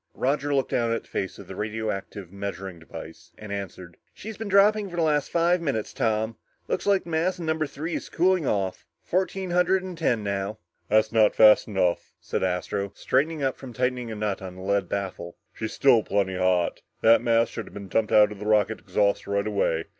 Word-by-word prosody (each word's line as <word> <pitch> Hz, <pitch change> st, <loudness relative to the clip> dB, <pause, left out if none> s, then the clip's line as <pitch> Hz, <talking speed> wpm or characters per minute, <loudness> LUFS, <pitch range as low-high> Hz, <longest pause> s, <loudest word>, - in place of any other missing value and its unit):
Roger 140 Hz, +2 st, 0 dB
looked 135 Hz, -2 st, +1 dB
down 115 Hz, -1 st, +1 dB
at 115 Hz, -, -1 dB
the -, -, -23 dB
face 95 Hz, -, -4 dB
of 100 Hz, -, -10 dB
the 95 Hz, -, -9 dB
radioactive 105 Hz, -3 st, -4 dB
measuring 95 Hz, -2 st, -6 dB
device 80 Hz, 0 st, -11 dB
and 105 Hz, -1 st, -9 dB
answered, 95 Hz, -3 st, -6 dB, 0.2 s
"She's 220 Hz, +1 st, -8 dB
been 220 Hz, +1 st, -6 dB
dropping 200 Hz, +1 st, +4 dB
for 175 Hz, -, -8 dB
the 170 Hz, -, +1 dB
last 150 Hz, -2 st, +1 dB
five 170 Hz, +1 st, +2 dB
minutes, 135 Hz, -10 st, -2 dB
Tom. 110 Hz, -1 st, -1 dB, 0.3 s
Looks -, -, -2 dB
like 200 Hz, -1 st, +3 dB
the 170 Hz, -, -9 dB
mass 170 Hz, +4 st, +1 dB
in 170 Hz, -, -6 dB
number 160 Hz, -1 st, 0 dB
three 160 Hz, +4 st, -5 dB
is -, -, -4 dB
cooling 180 Hz, -3 st, +2 dB
off. 95 Hz, -2 st, -2 dB, 0.2 s
Fourteen 185 Hz, 0 st, -1 dB
hundred 180 Hz, +2 st, +3 dB
and 185 Hz, -1 st, -6 dB
ten 120 Hz, -9 st, 0 dB
now." 100 Hz, +1 st, -2 dB, 0.3 s
"That's 110 Hz, 0 st, +3 dB
not 110 Hz, -2 st, +4 dB
fast 110 Hz, -1 st, +7 dB
enough," 95 Hz, -4 st, 0 dB
said -, -, -3 dB
Astro, 95 Hz, +2 st, -2 dB
straightening 150 Hz, +3 st, 0 dB
up 135 Hz, -1 st, 0 dB
from 130 Hz, -3 st, -10 dB
tightening 125 Hz, -1 st, -1 dB
a -, -, -4 dB
nut 105 Hz, -2 st, -2 dB
on 95 Hz, -1 st, -7 dB
the 95 Hz, -, -9 dB
lead 100 Hz, 0 st, 0 dB
baffle. 95 Hz, -3 st, -4 dB, 0.2 s
"She's 110 Hz, -, -5 dB
still 130 Hz, -5 st, +5 dB
plenty 100 Hz, -2 st, 0 dB
hot. 90 Hz, -1 st, +1 dB, 0.2 s
That 115 Hz, +1 st, +6 dB
mass 115 Hz, 0 st, +2 dB
should 115 Hz, -, -6 dB
have -, -, -13 dB
been 100 Hz, -1 st, -7 dB
dumped 110 Hz, +3 st, 0 dB
out 105 Hz, 0 st, +6 dB
of 105 Hz, -, -9 dB
the 105 Hz, -, -5 dB
rocket 110 Hz, 0 st, +2 dB
exhaust 100 Hz, -1 st, 0 dB
right 100 Hz, 0 st, 0 dB
away. 100 Hz, -6 st, 0 dB
110 Hz, 210 wpm, -25 LUFS, 100-155 Hz, 0.3 s, fast